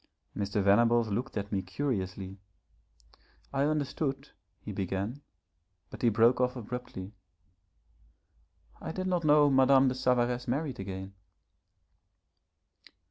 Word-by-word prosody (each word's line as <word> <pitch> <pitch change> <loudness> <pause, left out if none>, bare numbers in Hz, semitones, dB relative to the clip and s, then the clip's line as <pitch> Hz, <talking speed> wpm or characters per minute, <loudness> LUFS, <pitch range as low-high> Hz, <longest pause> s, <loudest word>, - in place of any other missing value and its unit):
Mr. 100 0 -1
Venables 115 +3 +4
looked 115 +4 -3
at 100 0 -4
me 100 -2 0
curiously. 95 -5 -4 1.1
'I 140 +1 +2
understood,' 145 -2 -2 0.3
he - - -7
began, 100 +8 -3 0.7
but - - -9
he 120 - +4
broke 115 +4 +4
off 125 0 +1
abruptly. 115 -5 -7 1.7
'I 160 - -5
did 185 +1 -3
not 180 -2 0
know 150 -1 +5
Madame 135 0 +5
de - - -1
Savaresse 125 -1 +1
married 135 +1 -2
again.' 95 0 -6
125 Hz, 110 wpm, -30 LUFS, 100-135 Hz, 1.7 s, know